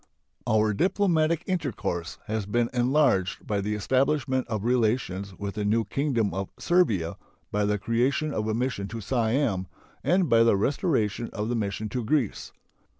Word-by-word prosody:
Our 110 0 +3
diplomatic 170 - +2
intercourse 110 - -3
has 110 -2 -3
been 120 +3 0
enlarged 125 -7 +2
by 105 -2 -1
the 105 +2 -2
establishment 130 +4 +1
of 110 -3 -3
relations 110 -6 0
with 100 -1 -4
the 105 - -3
new 110 +2 +2
Kingdom 120 -3 0
of 95 0 -3
Servia, 110 - +1 0.3
by 105 0 +1
the 105 0 +1
creation 130 +8 0
of 105 0 -2
a 110 - 0
mission 120 -5 -2
to 115 +2 -6
Siam, 115 -3 0 0.4
and 180 +4 +3
by 115 -3 +5
the 115 -3 +4
restoration 120 - 0
of 105 +2 -3
the 120 - 0
mission 105 -1 -2
to 125 +3 -3
Greece. 125 -2 -1
115 Hz, 155 wpm, -26 LUFS, 105-135 Hz, 0.4 s, by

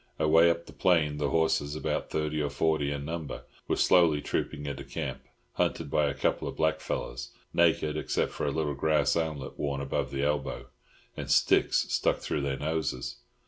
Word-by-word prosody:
Away 80 +2 +5
up 85 0 -1
the - - -13
plain 80 -5 +2
the 75 -1 0
horses, 75 -1 +1
about 75 - -2
thirty 75 0 -1
or 75 - 0
forty 75 0 +1
in 70 0 -4
number, 80 -1 -5 0.2
were - - +1
slowly 85 -5 +4
trooping 75 0 -3
into 70 -1 -4
camp, 65 - -5 0.3
hunted 70 - -1
by 75 -1 +3
a 70 - -2
couple - - 0
of - - -5
blackfellows, 65 -6 -2 0.2
naked 80 -3 +3
except 75 - -1
for 75 - -2
little 75 -1 -1
grass 75 0 +2
armlets 75 -5 -3
worn 70 -1 -1
above 70 -1 -2
the 70 0 -2
elbow, 75 0 -1 0.5
and - - -6
sticks - - +4
stuck - - +2
through 75 - -2
their 70 -1 -1
noses. 75 -4 -2
75 Hz, 175 wpm, -29 LUFS, 70-80 Hz, 0.5 s, Away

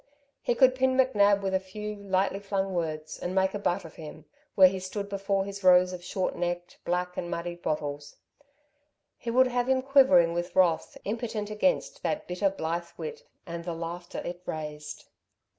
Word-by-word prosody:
He 240 - 0
could 260 0 +6
pin 260 0 +1
McNab 205 -6 +4
with 190 -1 -2
a 190 - +3
few, 210 +3 -6
lightly 195 0 0
flung 195 -1 -2
words 155 -3 -3
and 180 +1 -3
make 190 0 +2
a 205 - -3
butt 190 -1 -1
of 160 - -12
him, 155 -2 -10 0.3
where 190 -1 +9
he 190 +1 -2
stood 200 +2 -4
before 195 -1 -1
his 200 0 -7
rows 180 0 +6
of 175 -1 -7
short 185 +1 -2
necked, 175 0 -3
black 180 +1 -2
and 175 - -3
muddied 175 0 -4
bottles. 145 -2 -3 1.0
He 235 - -6
would 255 +2 +5
have 245 0 0
him 260 0 +2
quivering 255 -12 +5
with 175 +1 -3
wrath, 175 -3 +2
impotent 215 -1 -3
against 215 +6 0
that 305 - -2
bitter, 180 +3 +1
blithe 170 -2 -3
wit 465 0 -6 0.2
and 170 -1 -6
the 170 -1 -4
laughter 170 +1 -6
it 175 0 -5
raised. 150 -1 -6
190 Hz, 180 wpm, -28 LUFS, 175-210 Hz, 1.0 s, where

